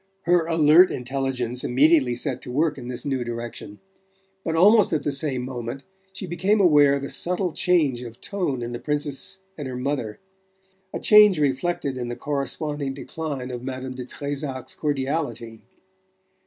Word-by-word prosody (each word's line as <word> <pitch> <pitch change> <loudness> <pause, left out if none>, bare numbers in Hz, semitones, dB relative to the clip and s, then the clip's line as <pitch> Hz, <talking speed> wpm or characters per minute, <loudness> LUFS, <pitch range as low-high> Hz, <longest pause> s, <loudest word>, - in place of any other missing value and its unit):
Her 175 -1 +3
alert 165 +2 +6
intelligence 125 -1 -2
immediately 135 -1 +3
set 130 +1 -2
to 125 - -7
work 150 +2 0
in 120 - -8
this 125 -1 -5
new 135 -3 -1
direction; 120 -3 -7 0.7
but 160 - -2
almost 210 +6 +5
at 155 - 0
the 145 - 0
same 140 -3 -2
moment 125 +1 -6 0.3
she 190 0 -7
became 190 +5 +1
aware 145 -6 +5
of 140 - -4
a 140 - -4
subtle 180 0 -1
change 155 -8 +1
of 120 -2 -9
tone 145 -11 -2
in 120 - -4
the 120 - -5
Princess 150 +5 -3 0.2
and 145 - -4
her 125 -1 -5
mother, 125 -5 -3 0.7
a - - -4
change 210 -3 +7
reflected 140 -1 -1
in 120 - -3
the 120 - -4
corresponding 145 0 -3
decline 140 -3 -5
of 120 -1 -5
Madame 130 0 -5
de 125 -1 -7
Trezac's 140 -3 -5
cordiality. 135 -6 -3
140 Hz, 160 wpm, -24 LUFS, 125-160 Hz, 0.7 s, change